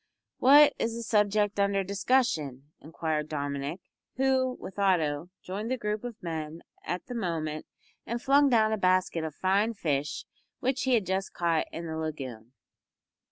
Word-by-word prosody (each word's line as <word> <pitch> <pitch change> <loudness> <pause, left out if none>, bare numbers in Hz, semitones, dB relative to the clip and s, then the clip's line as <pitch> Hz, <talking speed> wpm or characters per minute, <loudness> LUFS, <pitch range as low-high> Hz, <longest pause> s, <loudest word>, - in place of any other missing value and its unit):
"What 290 +3 +7
is 230 0 -1
the 235 - -5
subject 210 -1 +2
under 200 -1 +2
discussion?" 180 - 0
inquired 155 -1 -3
Dominick, 145 +3 -3 0.3
who, 260 -1 +1
with 190 +1 -8
Otto, 170 -5 +1
joined 205 +5 -4
the 260 - 0
group 210 -1 -3
of 240 -5 -8
men 160 -1 -5 0.2
at 180 0 -4
the 245 - -7
moment 160 -8 -3 0.4
and 235 +1 -3
flung 280 +2 +4
down 220 -3 +3
a - - 0
basket 185 -3 +2
of 155 -2 -5
fine 200 +4 +1
fish 145 -5 -2 0.3
which 260 +1 0
he 260 -1 +4
had 215 -5 +1
just 190 +1 -2
caught 165 -2 +1
in 170 - -6
the 160 -1 -4
lagoon. 130 -7 -6
190 Hz, 160 wpm, -28 LUFS, 155-225 Hz, 0.4 s, What